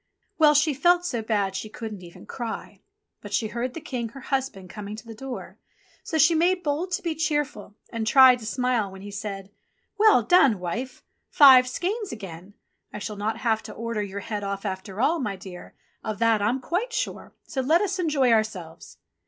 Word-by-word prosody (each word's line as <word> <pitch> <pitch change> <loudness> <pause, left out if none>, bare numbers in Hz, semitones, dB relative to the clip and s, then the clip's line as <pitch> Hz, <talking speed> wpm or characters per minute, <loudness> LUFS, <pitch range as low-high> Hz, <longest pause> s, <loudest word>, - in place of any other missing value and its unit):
Well, 300 -1 +6
she 300 +1 +3
felt 350 +5 +3
so 240 -10 -2
bad 205 -3 -1
she 215 - -4
couldn't 215 -3 -7
even 170 -1 -13
cry; 235 -3 -6 0.4
but - - -10
she 220 - -1
heard 240 +3 -4
the - - -4
King, 245 -6 -4
her 270 - -11
husband, 265 -9 -3
coming 210 +2 -7
to 220 +2 -11
the 230 - -9
door, 260 +3 -8 0.4
so 320 - -2
she 315 +3 +5
made 355 +3 +2
bold 310 +5 -1
to - - -1
be 335 -2 -1
cheerful, 295 -10 -2 0.2
and 225 -2 -3
tried 260 0 +7
to 220 - -8
smile 245 -4 0
when 190 0 -11
he 205 - -8
said, 200 -1 -6 0.5
"Well 425 - +6
done, 275 - +5
wife! 225 +9 -5 0.3
Five 260 -3 +8
skeins 400 - -3
again! 195 -2 -9 0.4
I - - -6
shall 210 0 -5
not 215 +2 -2
have 225 -2 0
to 220 - -9
order 230 -2 -3
your 200 0 -5
head 210 -1 -4
off 200 +1 -4
after 190 +1 -5
all, 315 +7 +2
my 205 -7 -2
dear, 185 -1 -11 0.3
of 215 -2 -3
that 230 -2 +3
I'm 240 +6 0
quite 380 - -2
sure, - - -4
so 265 - -3
let 315 +7 +3
us 385 -2 -1
enjoy 290 -7 +2
ourselves." 215 -7 -2
230 Hz, 195 wpm, -25 LUFS, 205-290 Hz, 0.5 s, Five